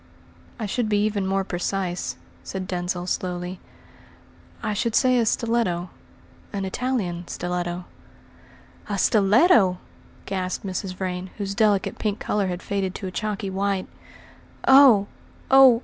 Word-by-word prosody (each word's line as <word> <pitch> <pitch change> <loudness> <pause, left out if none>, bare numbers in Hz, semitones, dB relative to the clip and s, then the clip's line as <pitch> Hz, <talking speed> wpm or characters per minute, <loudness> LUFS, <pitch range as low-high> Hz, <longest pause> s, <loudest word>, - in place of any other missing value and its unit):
"I 225 - -3
should 220 +2 -1
be 210 - +2
even 205 -3 -1
more 195 0 +1
precise," 180 0 -2 0.3
said 190 -1 -5
Denzil 180 0 -2
slowly. 180 0 -3 1.0
"I 215 - -1
should 220 +2 -1
say 255 -2 +4
a 230 - +1
stiletto 215 -7 0 0.6
an 195 -2 -3
Italian 190 -6 -2
stiletto." 175 0 -3 1.0
"A 200 - -1
stiletto!" 210 - +4 0.5
gasped 185 0 -3
Mrs. 185 0 -4
Vrain, 185 0 -4
whose 200 -2 -3
delicate 205 -2 +1
pink 210 -1 -1
colour 205 -2 0
had 180 0 -4
faded 195 -2 -2
to 200 - -6
a 185 - -4
chalky 205 0 -3
white. 195 0 -1 0.8
"Oh! 265 -7 +8 0.5
oh! 265 -3 +8
195 Hz, 130 wpm, -24 LUFS, 185-215 Hz, 1.0 s, Oh